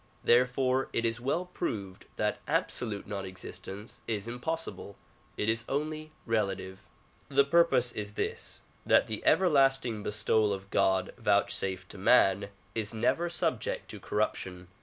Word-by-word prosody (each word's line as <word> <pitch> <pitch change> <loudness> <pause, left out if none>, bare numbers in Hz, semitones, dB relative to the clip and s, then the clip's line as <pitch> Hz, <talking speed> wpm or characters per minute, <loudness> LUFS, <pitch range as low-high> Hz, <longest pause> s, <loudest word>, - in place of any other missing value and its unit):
Therefore 130 +2 +3
it 115 - +1
is 115 +1 -1
well 155 +8 0
proved 100 - -5
that - - 0
absolute 110 -4 -1
non 100 -1 -4
existence 95 +2 -8
is 110 -1 -2
impossible; 125 -3 -4 0.4
it 105 - -1
is 110 0 +2
only 155 +2 -2
relative. 95 -4 -2 0.4
The 140 0 +4
purpose 140 -5 +4
is 105 -2 -5
this; - - -3
— - - -33
that - - +5
the 110 -1 -4
everlasting 135 - +3
bestowal 105 0 +2
of 95 0 -7
God 95 -1 +2
vouchsafed 95 -3 +1
to 100 - -9
man 100 -2 +4 0.2
is 110 -1 -3
never 130 +10 +1
subject 165 -9 -1
to - - -8
corruption. 95 -4 -2
110 Hz, 140 wpm, -30 LUFS, 100-135 Hz, 0.4 s, that